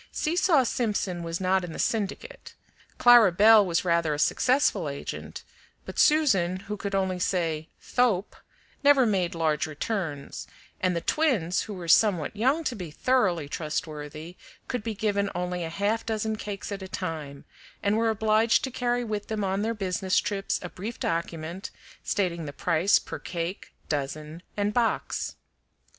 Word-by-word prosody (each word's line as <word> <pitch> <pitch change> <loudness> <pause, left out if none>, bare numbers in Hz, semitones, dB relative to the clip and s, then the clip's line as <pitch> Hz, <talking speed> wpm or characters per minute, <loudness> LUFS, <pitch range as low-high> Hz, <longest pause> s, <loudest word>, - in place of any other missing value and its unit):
Seesaw 330 -3 +2
Simpson 205 -7 -1
was 165 0 -3
not 190 0 +2
in 170 -2 -6
the - - -7
syndicate. 225 - -3 0.4
Clara 240 -5 +7
Belle 215 +4 +7
was 175 -1 0
rather 170 -3 +2
a - - -5
successful 205 - +2
agent, 140 - -6 0.4
but - - -6
Susan, 195 - +3
who 210 +1 -5
could 200 -1 -4
only 190 -1 0
say 165 -4 -1
"thoap," 225 -6 0 0.5
never 280 -2 +6
made 190 -5 0
large 155 -2 0
returns, 155 -2 -4 0.3
and 185 -1 +1
the 170 - -1
twins, 220 - +1
who 210 - -6
were 175 -2 -7
somewhat 180 -1 +3
young 265 +10 +2
to 260 - -1
be 180 -6 -6
thoroughly 180 - +1
trustworthy, 155 +2 -5 0.3
could 250 - -2
be 220 0 -4
given 200 -1 0
only 180 0 -2
a 165 - -4
half 205 +6 -1
dozen 220 -1 -2
cakes 205 -1 -6
at 200 -1 -4
a 190 - -6
time, 155 -7 -5 0.4
and 200 +1 +2
were 225 +1 +2
obliged 220 +1 +3
to 265 - -2
carry 245 0 0
with 210 -3 -4
them 215 -2 -2
on 195 +1 0
their 225 +2 -1
business 190 -1 -1
trips 195 -1 -2
a 180 - -5
brief 210 +7 -7
document 165 +2 -3 0.3
stating 170 -5 -1
the 145 - -6
price 175 +5 +3
per - - -6
cake, 175 +2 -5 0.2
dozen, 150 +3 -4 0.2
and 205 +1 0
box. 235 -1 -1
190 Hz, 160 wpm, -27 LUFS, 170-220 Hz, 0.5 s, Clara